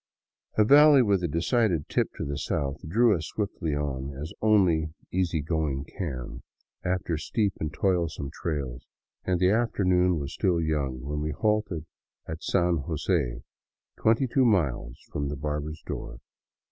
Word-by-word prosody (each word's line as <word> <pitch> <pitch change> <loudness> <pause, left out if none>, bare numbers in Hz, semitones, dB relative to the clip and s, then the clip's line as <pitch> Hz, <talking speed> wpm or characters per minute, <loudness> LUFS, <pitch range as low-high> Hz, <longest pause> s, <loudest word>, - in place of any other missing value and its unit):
A 110 - +6
valley 145 +1 +8
with 100 -4 +2
a - - +2
decided 85 - +1
tip - - 0
to - - -4
the 70 0 -3
south 70 0 -2
drew 115 +3 +4
us 80 -2 -4
swiftly 95 -7 -2
on, 70 -2 -3
as 80 +6 -6
only 85 -8 +3 0.2
easy 85 -4 0
going 75 -4 -1
can, 70 - -6 0.4
after 90 -3 -1
steep 100 +4 0
and 75 - -2
toilsome 85 -5 -1
trails, 70 -6 -4 0.4
and 90 -1 +1
the 90 +1 +4
afternoon 90 -6 +2
was 70 -2 -4
still 90 -4 +1
young 70 -5 -1
when 75 +3 -3
we 75 - -1
halted 95 -1 0 0.4
at 80 +1 -6
San 90 -2 +2
Jose, 75 -5 -1 0.5
twenty 115 +4 +3
two 130 +2 +2
miles 75 - +1
from 70 -1 -2
the 75 - -3
barber's 75 +2 -4
door. 65 - -6
80 Hz, 150 wpm, -27 LUFS, 75-95 Hz, 0.5 s, valley